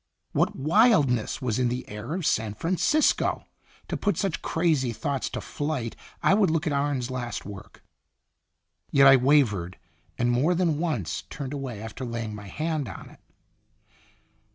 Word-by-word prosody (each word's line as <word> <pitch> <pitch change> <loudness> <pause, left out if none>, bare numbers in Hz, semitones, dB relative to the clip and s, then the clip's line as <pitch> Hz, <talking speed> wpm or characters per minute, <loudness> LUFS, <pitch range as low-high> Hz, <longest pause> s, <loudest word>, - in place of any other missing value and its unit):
What - - +1
wildness 150 - +3
was 120 -2 0
in 125 -1 +2
the 125 +1 -4
air 105 +9 -5
of 185 -4 -3
San 105 -1 0
Francisco! 185 - +1 0.4
To - - -3
put 205 - 0
such 195 -5 -1
crazy 155 -8 +1
thoughts 135 +4 -2
to - - -5
flight 145 -6 -3 0.3
I - - +5
would 200 -3 +4
look 160 +2 0
at 150 - 0
Arne's 140 -3 -1
last 120 -2 -4
work. 100 -2 -11 1.1
Yet 140 -1 +5
I 135 0 +9
wavered, 120 -10 +2 0.4
and 120 0 +1
more 145 +9 +2
than 165 -4 +1
once 125 - -2
turned 140 -1 -6
away 135 -6 -5
after 110 +4 -7
laying 115 -3 -4
my 105 -1 -8
hand 155 0 -2
on 95 - -10
it. - - -18
135 Hz, 155 wpm, -26 LUFS, 115-160 Hz, 1.1 s, I